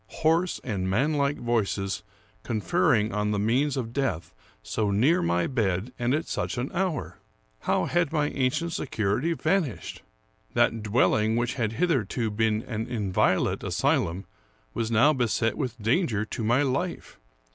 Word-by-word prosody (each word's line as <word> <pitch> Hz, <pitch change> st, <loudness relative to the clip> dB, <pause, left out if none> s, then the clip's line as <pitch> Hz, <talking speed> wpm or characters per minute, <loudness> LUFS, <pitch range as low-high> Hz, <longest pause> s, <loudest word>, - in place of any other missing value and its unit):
Hoarse 165 Hz, +3 st, +2 dB
and 95 Hz, -6 st, -2 dB
manlike 140 Hz, +6 st, +1 dB
voices 105 Hz, -5 st, -1 dB, 0.4 s
conferring 105 Hz, 0 st, +1 dB
on 105 Hz, 0 st, 0 dB
the 105 Hz, -, 0 dB
means 125 Hz, +7 st, +1 dB
of 115 Hz, -3 st, -4 dB
death, 130 Hz, -, -2 dB, 0.3 s
so 105 Hz, -, -1 dB
near 120 Hz, +12 st, +3 dB
my 85 Hz, +1 st, +1 dB
bed, 110 Hz, -2 st, -1 dB
and 120 Hz, +3 st, +1 dB
at 155 Hz, -, -2 dB
such -, -, -3 dB
an 125 Hz, +3 st, -2 dB
hour! 185 Hz, -3 st, -2 dB, 0.4 s
How -, -, 0 dB
had 175 Hz, -3 st, +1 dB
my 150 Hz, -2 st, +1 dB
ancient 150 Hz, +6 st, -1 dB
security 125 Hz, +6 st, -1 dB
vanished! 165 Hz, -, -1 dB, 0.5 s
That 115 Hz, -, +2 dB
dwelling 110 Hz, 0 st, +2 dB
which 120 Hz, +1 st, 0 dB
had 115 Hz, -4 st, -1 dB
hitherto 120 Hz, -, 0 dB
been 110 Hz, +1 st, +1 dB
an 110 Hz, -2 st, -4 dB
inviolate 95 Hz, -5 st, +1 dB
asylum 90 Hz, +4 st, 0 dB, 0.5 s
was 115 Hz, -1 st, -2 dB
now 115 Hz, +7 st, +5 dB
beset 120 Hz, -3 st, 0 dB
with 125 Hz, -5 st, -3 dB
dan 130 Hz, -, +2 dB
ger 110 Hz, -2 st, -1 dB
to 110 Hz, -, -5 dB
my 120 Hz, +6 st, +3 dB
life. 145 Hz, +7 st, -3 dB
120 Hz, 145 wpm, -26 LUFS, 105-140 Hz, 0.5 s, now